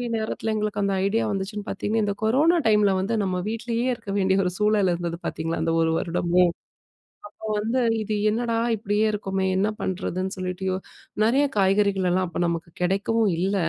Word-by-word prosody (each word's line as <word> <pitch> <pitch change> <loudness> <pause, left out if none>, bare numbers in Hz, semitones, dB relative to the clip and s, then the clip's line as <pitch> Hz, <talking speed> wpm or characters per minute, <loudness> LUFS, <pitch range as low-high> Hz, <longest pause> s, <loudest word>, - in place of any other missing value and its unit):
நேரத்தில 220 0 -2
எங்களுக்கு 210 -1 -1
அந்த 200 0 +1
ஐடியா 225 +3 +1
வந்துச்சுன்னு 200 +1 -4
பாத்தீங்கன்னா, 215 +3 -1
இந்த 200 -1 0
கொரோனா 290 +10 +3
டைம்ல 210 -2 +4
வந்து 200 +5 -1
நம்ம 185 -1 -1
வீட்லேயே 230 +2 -2
இருக்க 225 -3 -9
வேண்டிய 190 0 +2
ஒரு 180 - 0
சூழல் 210 -2 +3
இருந்தது 170 -1 -3
பாத்தீங்களா, 165 +1 -2
அந்த 165 - +1
1 160 0 +2
வருடமும். 175 0 +2 0.8
அப்போ 220 - -9
வந்து 230 +5 0 0.2
இது 215 0 -2
என்னடா! 230 +1 0 0.2
இப்பிடியே 210 0 0
இருக்கமே! 195 -2 -2
என்ன 205 +3 +2
பண்றதுன்னு 185 0 -2
சொல்லிட்டு 185 0 -4
யோ 185 - 0 0.5
நெறைய 270 +6 +3
காய்கறிகள்லாம் 190 -2 +2
அப்ப 170 - -4
நமக்கு 170 0 -3
கிடைக்கவும் 200 +4 +1
இல்ல. 195 +3 0
200 Hz, 160 wpm, -24 LUFS, 185-220 Hz, 0.8 s, டைம்ல